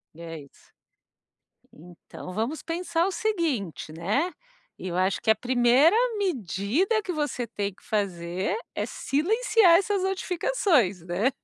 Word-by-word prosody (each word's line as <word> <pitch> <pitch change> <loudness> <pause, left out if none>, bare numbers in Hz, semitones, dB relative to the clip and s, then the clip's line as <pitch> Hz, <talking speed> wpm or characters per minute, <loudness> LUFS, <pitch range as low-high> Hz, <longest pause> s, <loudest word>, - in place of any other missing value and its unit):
É 165 -1 -8
isso. 140 - -20 1.0
Então, 175 +2 -11
vamos 230 +10 -2
pensar 340 +1 -1
o 390 - -2
seguinte, 320 - -2
né, 215 - -1 0.5
eu 180 -1 -4
acho 185 +1 +1
que - - +1
a 220 - +7
primeira 250 - +4 0.2
medida 285 - 0
que 365 - -4
você 295 -6 -2
tem 205 -2 -3
que - - -25
fazer 185 - -2 0.2
é - - -2
silenciar 420 - +3
essas 395 0 0
notificações, 360 - +1
né? 185 +9 +1
250 Hz, 125 wpm, -26 LUFS, -, 1.0 s, a